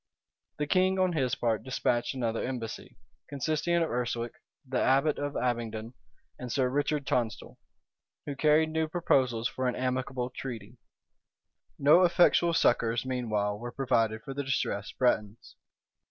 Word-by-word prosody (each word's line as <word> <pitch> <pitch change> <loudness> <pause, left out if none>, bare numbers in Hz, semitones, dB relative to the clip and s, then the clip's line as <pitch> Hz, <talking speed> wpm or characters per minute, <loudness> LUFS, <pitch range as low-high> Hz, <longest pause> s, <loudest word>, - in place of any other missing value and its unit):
The 150 - -1
king, 185 +4 +2
on 185 -1 +2
his 130 -6 0
part, 115 -3 0
despatched 125 -1 -1
another 115 -3 -1
embassy, 120 -5 -6 0.3
consisting 155 +4 -1
of 165 -1 +1
Urswic, 120 -1 -2 0.4
the 130 - -1
abbot 140 +3 +2
of 145 0 -3
Abingdon, 115 -2 -2 0.5
and 125 -1 -6
Sir 130 -1 +1
Richard 145 +1 -1
Tonstal, 120 -5 -2 0.7
who 145 - -4
carried 155 +2 +3
new 160 0 0
proposals 130 -8 +1
for 130 +1 -3
an 125 - -1
amicable 130 0 -2
treaty. 120 -3 -7 1.0
No 150 +6 +6
effectual 175 -1 +4
succors, 115 -5 +2
meanwhile, 110 -5 -1
were 120 +1 -6
provided 115 -5 0
for 135 -2 -6
the 140 +1 -3
distressed 110 -6 -2
Bretons. 110 -4 0
130 Hz, 140 wpm, -29 LUFS, 115-145 Hz, 1.0 s, No